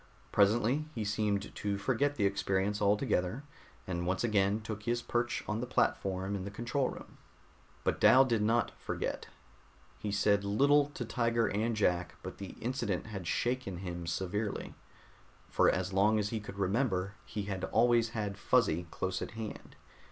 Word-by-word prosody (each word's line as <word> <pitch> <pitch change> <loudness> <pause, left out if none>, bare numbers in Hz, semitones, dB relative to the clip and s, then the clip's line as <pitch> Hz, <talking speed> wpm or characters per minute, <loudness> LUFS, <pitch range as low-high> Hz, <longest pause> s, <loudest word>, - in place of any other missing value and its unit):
Presently 115 +8 +3
he 110 -3 -2
seemed 105 -1 -1
to 100 -1 -2
forget 135 +7 +1
the 105 - +1
experience 100 +1 0
altogether, 105 +3 +1 0.4
and 85 -1 -3
once 95 +3 0
again 105 -2 +2
took 110 -1 -6
his 120 +2 0
perch 120 0 -1
on 105 +1 -1
the 125 - -3
platform 95 -5 0
in 95 - -4
the 100 - -5
control 120 +6 -1
room. - - -11 0.6
But - - 0
Dal 130 +1 +8
did 115 -4 +1
not 115 +2 +2
forget. - - -3 0.7
He 105 - -3
said 100 0 +2
little 140 +8 +4
to - - -3
Tiger 115 -2 +1
and 110 +3 0
Jack, 90 -6 +1
but 95 - -7
the 100 -2 -7
incident 120 -6 -2
had 100 -5 -6
shaken 120 -5 -1
him 85 -2 -5
severely. 95 +5 -2 0.8
For - - +4
as 95 0 -1
long 105 +3 +4
as 105 -1 0
he 110 - -2
could 105 -1 -9
remember, 100 -1 0
he 105 - -5
had 100 -2 -3
always 115 0 +3
had 105 -3 -4
Fuzzy 95 -9 +2
close 95 +3 -3
at - - -3
hand. 110 -2 -7
105 Hz, 165 wpm, -32 LUFS, 95-115 Hz, 0.8 s, Dal